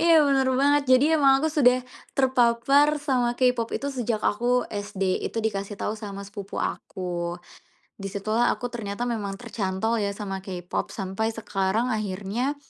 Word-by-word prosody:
Iya, 325 -2 +6
benar 270 -2 +3
banget. 285 +1 +4
Jadi 260 - +3
emang 275 -3 +5
aku 315 -1 0
sudah 255 -4 +4 0.3
terpapar 265 +3 +4
sama 255 -5 0
K-Pop 250 -3 +2
itu 280 0 -4
sejak 235 -4 -2
aku 245 +3 +2
SD. 195 -2 -1
Itu 225 -1 -3
dikasih 200 -1 -2
tahu 210 - -2
sama 200 -2 -7
sepupu 200 0 -8
aku, 175 -2 -3 0.6
di 195 - -5
situlah 215 +4 +1
aku 245 - -4
ternyata 225 -1 -4
memang 205 -4 -3
tercantol 220 -1 -1
ya 200 -1 -1
sama 195 -2 -5
K-Pop 180 -2 -4
sampai 200 +3 -2
sekarang 215 +1 -1
akhirnya 215 +6 -2
225 Hz, 150 wpm, -25 LUFS, 200-255 Hz, 0.6 s, Iya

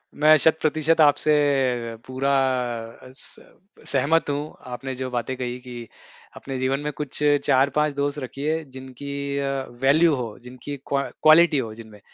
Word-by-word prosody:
मैं 155 +1 +6
शत-प्रतिशत 155 +1 +2
आपसे 150 0 +5 0.7
पूरा 130 +2 -2 0.8
स - - -3 0.5
सहमत 145 +4 +3
हूँ। 145 +2 -4 0.2
आपने 130 +2 -5
जो 130 0 -4
बातें 125 +1 -3
कही 125 -1 -4
कि 120 -2 -9 0.5
अपने 135 -1 -6
जीवन 130 +1 0
में 150 0 -3
कुछ 145 -1 -3 0.2
4-5 140 +2 +2
दोस्त 145 +1 -2
रखिए 150 +4 -3
जिनकी 130 +2 -8 0.7
वैल्यू 155 +4 +4
हो, 115 -5 -5
जिनकी 125 +3 -8
क्व 140 -1 0 0.2
क्वालिटी 155 0 +6
हो 115 -5 -3
जिनमें। 110 -2 -13
140 Hz, 135 wpm, -23 LUFS, 130-150 Hz, 0.8 s, मैं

